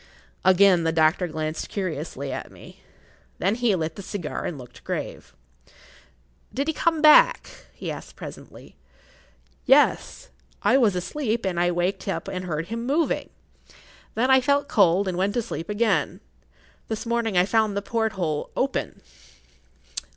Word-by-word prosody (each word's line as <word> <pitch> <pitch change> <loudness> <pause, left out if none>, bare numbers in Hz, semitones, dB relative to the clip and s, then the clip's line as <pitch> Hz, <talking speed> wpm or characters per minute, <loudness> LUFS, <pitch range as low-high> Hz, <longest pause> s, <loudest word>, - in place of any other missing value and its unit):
Again 185 -1 +5
the 165 - +1
doctor 160 +3 +2
glanced 155 -1 -4
curiously 155 -7 -4
at - - -6
me. - - -15 0.6
Then 195 +3 +1
he 235 -3 +1
lit 160 -2 -3
the - - -7
cigar 185 -4 -5
and 165 - -4
looked 125 -2 -13
grave. - - -5 1.2
"Did 275 +3 -2
he 320 - +1
come 325 0 0
back?" - - +6 0.2
he - - -6
asked - - -9
presently. - - -11 0.9
"Yes. 295 - +3 0.3
I - - +4
was 230 -8 +4
asleep, 230 +5 -2
but 180 -3 -1
I 175 0 +3
waked 175 +3 -1
up 195 - -3
and 185 0 -4
heard 165 0 -3
him 230 +1 -4
moving. 295 +6 0 0.9
Then 255 +4 +2
I 265 0 +6
felt 280 +2 +1
cold 195 -1 +3
and 180 -1 -2
went 200 +4 0
to 240 - +2
sleep 190 -6 -6
again. 200 -6 0 0.7
This 220 +2 -4
morning 230 -4 0
I 180 - +5
found 215 -1 +1
the 200 - -2
porthole 195 -9 -2
open." - - -2
195 Hz, 150 wpm, -24 LUFS, 175-235 Hz, 1.2 s, back